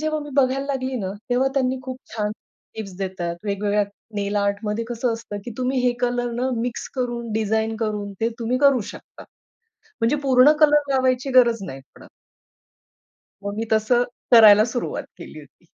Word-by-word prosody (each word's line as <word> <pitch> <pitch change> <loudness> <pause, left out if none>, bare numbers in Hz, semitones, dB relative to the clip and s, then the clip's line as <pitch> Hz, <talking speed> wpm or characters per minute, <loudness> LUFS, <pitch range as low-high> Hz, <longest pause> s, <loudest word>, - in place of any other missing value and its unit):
जेव्हा 310 0 -1
मी 295 0 -8
बघायला 270 0 +2
लागली 265 -2 -2
ना, 190 -1 -3 0.2
तेव्हा 255 +2 +2
त्यांनी 260 -1 +1
खूप 255 -1 -6 0.2
छान 210 -2 -1 0.5
टिप्स 195 -4 -7
देतात. 185 -3 -3
वेगवेगळ्या 205 0 0 0.3
नेल 205 0 -1
आर्टमध्ये 205 +2 -1
कसं 240 0 -1
असतं, 225 -2 -6
की - - -6
तुम्ही 255 +1 0
हे 245 - +3
कलर 245 0 0
ना, 255 - +1
मिक्स 240 0 -4
करून 240 -3 -3
डिझाइन 220 +1 0
करून 210 -2 -3
ते 225 - +2
तुम्ही 240 +2 -1
करू 275 -2 +4
शकता. - - -13 0.8
म्हणजे 230 +6 +2
पूर्ण 265 +1 +6
कलर 295 -2 +4
लावायची 260 0 +1
गरज 235 -3 +1
नाही 135 -6 -8
पडत. - - -15 1.4
मग 200 0 -3
मी 225 - -2
तसं 220 +3 +3 0.3
करायला 215 -2 +9
सुरुवात 245 +1 -3
केली - - -11
होती. - - -20
235 Hz, 165 wpm, -22 LUFS, 210-255 Hz, 1.4 s, करायला